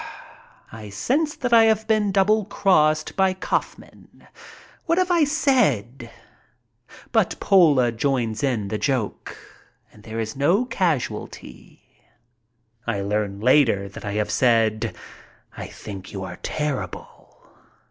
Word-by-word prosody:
I 110 -2 -9
sense 280 - -1
that 250 -3 -2
I 225 -1 +7
have 220 0 +2
been 215 -2 +1
double 205 +2 +2
crossed 155 -7 +1
by 190 -1 +2
Kaufman. 190 - -5 0.6
What 335 +1 +2
have 370 -1 +1
I 340 -3 +4
said? 150 - 0 1.0
But - - +1
Pola 150 -11 +4
joins 115 -2 -1
in 120 -8 -1
the 110 0 -3
joke, 130 -7 -3 0.6
and 105 - -17
there 110 +1 -7
is 110 0 -4
no 170 - +2
casualty. 160 - -4 1.0
I 100 - -1
learn 100 0 -2
later 120 -6 +3
that 100 - -11
I 100 - -4
have 105 0 -1
said, 115 -3 +1 0.6
"I - - -7
think 100 -3 -10
you 95 -2 -6
are 90 -1 -8
terrible." 150 -3 -5
135 Hz, 125 wpm, -23 LUFS, -, 1.0 s, I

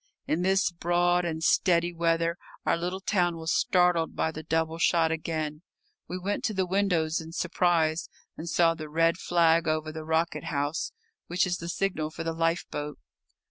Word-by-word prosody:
In 160 - 0
this 190 0 +2
broad 175 +1 +1
and 160 -1 -3
steady 175 0 +3
weather 165 0 +1 0.3
our - - +3
little 180 +3 -3
town 175 -4 +1
was 160 +1 -1
startled 180 -3 +2
by 160 - 0
the 155 - -7
double 160 +1 -1
shot 165 0 +3
again. 155 -1 -3 0.5
We 180 - -4
went 195 +3 -2
to 215 - -1
the 190 -1 +1
windows 175 -4 +1
in 160 0 -10
surprise, 170 -3 +1 0.3
and 165 +2 -6
saw 165 0 +4
the 155 -2 -8
red 165 +3 +2
flag 165 -1 +3
over 155 0 0
the 160 0 -7
rocket 160 +1 0
house, 145 +1 -2 0.4
which 180 +3 +1
is 180 0 -1
the 170 - -6
signal 175 -4 -1
for 165 +1 -6
the 165 0 -2
lifeboat. 165 -3 -2
165 Hz, 175 wpm, -28 LUFS, 160-175 Hz, 0.5 s, saw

